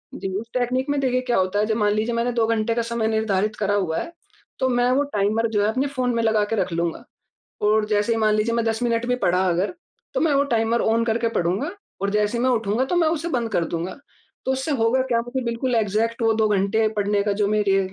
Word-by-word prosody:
जी, 195 - -4
उस 230 - -9
टेकनीक 255 +2 0
में, 285 -1 +1
देखिए, 255 -1 +1
क्या 250 -1 0
होता 190 +2 +1
है, 210 - +2
जब 220 0 0
मान 210 -1 +2
लीजिये 220 +3 -1
मैंने 235 +1 0
2 230 -2 +2
घंटे 230 0 +1
का 235 - +1
समय 230 -1 -1
निर्धारित 215 -1 0
करा 205 0 0
हुआ 175 -5 0
है, 335 - -6 0.5
तो 260 - +2
मैं 245 0 +2
वो 280 +3 +3
टाइमर 215 +3 +1
जो 205 -2 +1
है, 210 - +2
अपने 260 +5 0
फ़ोन 255 -3 -1
में 230 - 0
लगा 220 -2 +2
के - - +2
रख 190 - 0
लूँगा। 170 0 -2 0.7
और 215 0 +3
जैसे 210 +2 +1
ही 225 - 0
मान 215 -1 +3
लीजिए, 220 +2 +1
मैं 235 - +1
10 225 +2 -1
मिनट 230 0 0
भी 250 0 +1
पढ़ा 180 +2 +2
अगर, 180 +2 -1 0.4
तो - - 0
मैं 320 -3 +2
वो 280 +1 +3
टाइमर 225 +1 +1
ऑन 230 +1 +2
करके 230 +1 +1
पढूँगा, 190 - -1 0.3
और 200 - +1
जैसे 210 +3 0
ही - - -1
मैं 260 - +3
उठूँगा, 225 +1 +1
तो 350 - -1
मैं 330 -2 +3
उसे 325 +1 -2
बंद 235 -7 -1
कर 170 - +1
दूँगा। 175 +9 -4 0.5
तो 265 - +2
उससे 265 +4 -2
होगा 245 +3 +3
क्या, 230 0 +3
मुझे 250 +2 -4
बिल्कुल 235 +2 -1
एग्ज़ैक्ट 225 +2 0
वो 225 0 +4
2 220 0 +2
घंटे 210 +2 +2
पढ़ने 205 0 +1
का 205 0 0
जो 200 - +3
मेरे 205 -2 +2
225 Hz, 255 wpm, -23 LUFS, 210-245 Hz, 0.7 s, वो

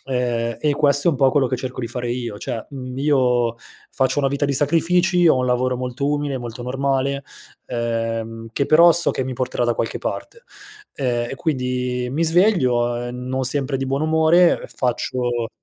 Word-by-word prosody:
ehm, 120 -3 -1
e 150 -2 +1
questo 145 +2 +3
è - - +6
un - - -3
po' 135 0 +4
quello 135 -1 +2
che 130 - -1
cerco 130 +1 -5
di 115 - -3
fare 120 0 -4
io: 120 -4 -4
cioè, 115 +1 -5
mhmm, 130 -1 -7
io 125 -5 +2 0.4
faccio 130 +2 0
una 135 - +2
vita 140 +1 -1
di 140 - 0
sacrifici, 175 +5 +2
ho 145 - +5
un 125 0 0
lavoro 125 +1 +1
molto 130 +2 -3
umile, 145 -2 -1
molto 120 0 -7
normale, 135 +2 -1 0.4
ehm, 115 -1 -3
che 140 +4 0
però 170 +2 +7
so 170 +1 +3
che 130 - -2
mi 130 -1 -4
porterà 125 0 -1
da 120 -1 +1
qualche 115 - -3
parte. 475 0 -6 0.5
Ehm, 120 -3 -1
e - - -4
quindi 125 -4 -2
mi 160 +5 0
sveglio, 130 - +2
ehm, 120 +1 -5
non 130 0 -1
sempre 135 +1 +1
di 135 0 -3
buon 135 +2 -1
umore, 160 +2 +4
ehm, - - -8
faccio 120 -1 -2
130 Hz, 190 wpm, -21 LUFS, 120-145 Hz, 0.5 s, però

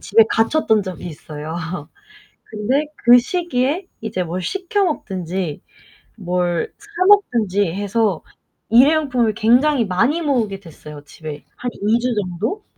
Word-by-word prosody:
집에 225 - +5
갇혔던 225 -2 +2
적이 185 -2 -7
있어요. 155 0 -7 0.9
근데 235 +8 -1
그 240 +1 +7
시기에 315 +2 -1
이제 210 -5 -2
뭘 175 +2 -4
시켜 390 - -1
먹든지, 185 - -3 0.6
뭘 175 -2 -1
사 415 -3 -2
먹든지 215 - +3
해서 205 -2 0 0.5
일회용품을 255 -2 +4
굉장히 245 +4 +3
많이 235 - +1
모으게 230 -10 0
됐어요. 150 -4 -12
집에 150 0 -9
한 245 - -4
2 215 +3 +1
주 250 0 0
정도. 210 - -3
220 Hz, 250 characters per minute, -20 LUFS, 180-275 Hz, 0.9 s, 그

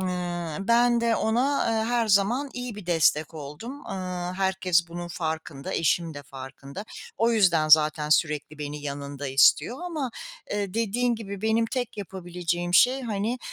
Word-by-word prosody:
Iıı, 175 -3 -3
ben 235 0 +4
de 230 -1 +2
ona, 250 +6 +1
ııı, 220 -1 +1
her 235 -1 +1
zaman 230 +8 +2
iyi 245 -3 -5
bir 205 -4 -10
destek 160 -2 +2
oldum. 160 - -8
Iıı, 180 -1 -4
herkes 190 -3 +1
bunun 175 +1 -6
farkında, 160 -4 -4
eşim 165 0 +1
de 145 - -8
farkında. 135 +6 -9 0.3
O 230 +1 +3
yüzden 175 -8 +3
zaten 155 -1 +5
sürekli 155 -1 +1
beni 150 0 -5
yanında 140 0 -5
istiyor 135 - +4
ama, 305 -8 -3 0.4
eee, 205 -1 -2
dediğin 235 +2 +1
gibi 200 -2 -7
benim 225 +1 +2
tek 245 -2 -3
yapabileceğim 175 -2 -3
şey, 260 +6 +5
hani, 220 +2 -2
185 Hz, 150 wpm, -26 LUFS, 160-230 Hz, 0.4 s, zaten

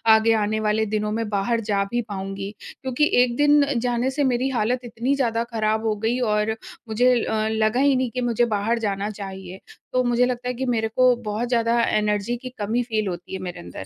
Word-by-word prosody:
आगे 225 +1 +3
आने 215 +1 -1
वाले 215 0 +1
दिनों 210 0 -1
में 225 0 -2
बाहर 215 +3 0
जा 200 0 +2
भी 240 0 +1
पाऊँगी। 195 0 -5 0.3
क्योंकि 265 +3 +1
एक 245 -1 +1
दिन 290 0 +5 0.2
जाने 245 +1 0
से 290 +2 0
मेरी 260 0 +1
हालत 245 0 0
इतनी 240 +4 -1
ज़्यादा 230 -4 0
खराब 220 0 0
हो 215 -1 +1
गई 240 +3 +1 0.2
और 210 +1 0 0.3
मुझे 245 +3 +3
अ, 215 0 0
लगा 220 +2 +1
ही 280 0 +4
नहीं 255 -1 0
कि 250 - -3
मुझे 240 0 +2
बाहर 225 +4 0
जाना 205 -1 -2
चाहिए। 190 -2 -8 0.3
तो 255 0 +3
मुझे 240 0 +3
लगता 250 0 -3
है 250 - -1
कि 260 +2 -3
मेरे 225 -3 0
को 255 -1 +5 0.2
बहुत 230 +4 -2
ज़्यादा 235 -1 +2
एनर्जी 210 +2 0
की 255 - -5
कमी 225 +4 0
फ़ील 220 -3 -1
होती 180 0 -6
है 190 - -3
मेरे 180 -1 -6
अंदर। 95 - -8
225 Hz, 210 wpm, -23 LUFS, 210-245 Hz, 0.3 s, दिन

